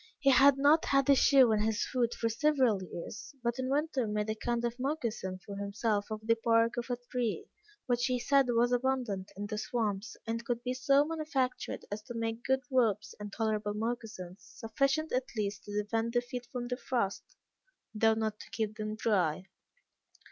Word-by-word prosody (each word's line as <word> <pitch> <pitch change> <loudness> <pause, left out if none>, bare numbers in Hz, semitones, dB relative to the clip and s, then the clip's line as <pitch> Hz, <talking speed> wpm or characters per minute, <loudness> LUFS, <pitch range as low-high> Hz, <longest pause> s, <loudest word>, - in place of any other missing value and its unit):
He 275 - +4
had 275 +1 +6
not 290 +4 +4
had 275 -1 +2
a - - +7
shoe 265 -3 +6
on 215 - +2
his 220 +1 0
foot 240 -2 0
for 230 - -1
several 255 -4 +2
years, 185 - -8
but 235 +1 -1
in 260 0 -1
winter 280 -4 0
made 210 +1 -1
a - - 0
kind 235 +2 -2
of 235 +1 -3
moccasin 235 -9 -2
for 200 - -7
himself 205 +1 -1
of 215 0 -6
the 230 0 +2
bark 230 0 +3
of 240 +1 -4
a 245 - -1
tree, 245 -4 -1 0.4
which 245 -1 +1
he 255 -1 +1
said 275 +2 +3
was 240 +1 +3
abundant 245 -6 -1
in 205 - -3
the 210 0 -4
swamps, 215 -3 -2
and 230 +1 -3
could 240 0 -2
be 250 - -1
so 275 +2 +3
manufactured 300 -5 -2
as 210 +1 -3
to 240 +2 -9
make 225 0 -3
good 265 0 +1
ropes, 220 -4 +1
and 205 -1 -6
tolerable 215 -1 -1
moccasins, 215 -5 -4
sufficient 275 - -1
at 255 0 0
least 205 -1 -2
to 205 0 -2
defend 225 +2 -1
the 240 - +3
feet 245 0 -7
from 245 -2 -4
the 250 0 -2
frost, 235 -8 -2 0.6
though 220 0 +3
not 220 -1 -2
to - - -11
keep 215 -1 -3
them 215 0 -3
dry. 185 -7 +1
230 Hz, 190 wpm, -31 LUFS, 215-255 Hz, 0.6 s, a